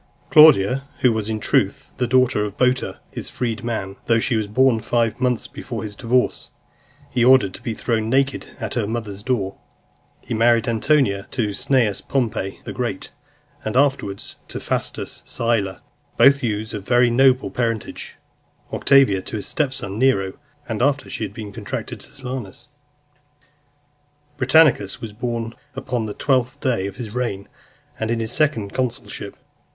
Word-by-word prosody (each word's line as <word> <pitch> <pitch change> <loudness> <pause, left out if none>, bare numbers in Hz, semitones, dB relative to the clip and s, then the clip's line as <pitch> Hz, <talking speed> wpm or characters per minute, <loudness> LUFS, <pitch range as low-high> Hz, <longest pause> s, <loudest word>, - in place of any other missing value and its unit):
Claudia, 135 -6 +7 0.2
who 125 -2 +4
was, 110 -1 -2
in 110 -1 -2
truth, - - 0
the 125 - 0
daughter 130 -3 +3
of 105 -1 -5
Boter 125 0 +1
his - - -6
freedman, 110 -4 -3
though 115 - +4
she 115 +2 +1
was 110 -2 0
born 125 +2 +3
five 115 +1 0
months 125 -2 +1
before - - -6
his 105 -1 -6
divorce, 125 +4 0 0.6
he 120 - +2
ordered 125 -7 +5
to - - -10
be 115 - -3
thrown 110 -2 -1
naked 135 +2 +1
at - - -4
her 115 -4 -1
mother's 105 -3 -4
door. 105 -5 -2 0.6
He - - -6
married 115 0 +3
Antonia 115 -4 +1
to 105 -5 -1
Cneius 115 -4 +1
Pompey 115 -7 -2
the - - -6
Great, 115 -6 -4 0.5
and 110 +3 -2
afterwards 135 -8 0
to - - -6
Faustus - - -3
Sylla, 110 -5 -1 0.3
both 140 +1 +6
youths 110 -2 -2
of 105 - -4
very 120 +2 +3
noble 130 +1 +4
parentage; 115 -3 -3 0.6
Octavia 135 -9 +4
to 110 - -7
his 105 - -3
step 145 -4 0
son 100 -5 -4
Nero, 100 -8 +2 0.3
after 135 +5 0
she - - -4
had - - -4
been 105 -4 -8
contracted - - -6
to - - -8
Silanus. 130 -3 -7 1.7
Britannicus 130 -7 +4
was 115 -3 -7
born 115 0 -3 0.2
upon 120 -4 -2
the 105 - -6
twentieth 130 0 0
day 120 -9 0
of 100 - -8
his 115 -4 -7
reign, 115 -6 -3 0.5
and 110 - -2
in 115 0 0
his 110 -1 -1
second 115 -10 +1
consulship. 125 -2 -4
115 Hz, 155 wpm, -21 LUFS, 105-130 Hz, 1.7 s, Claudia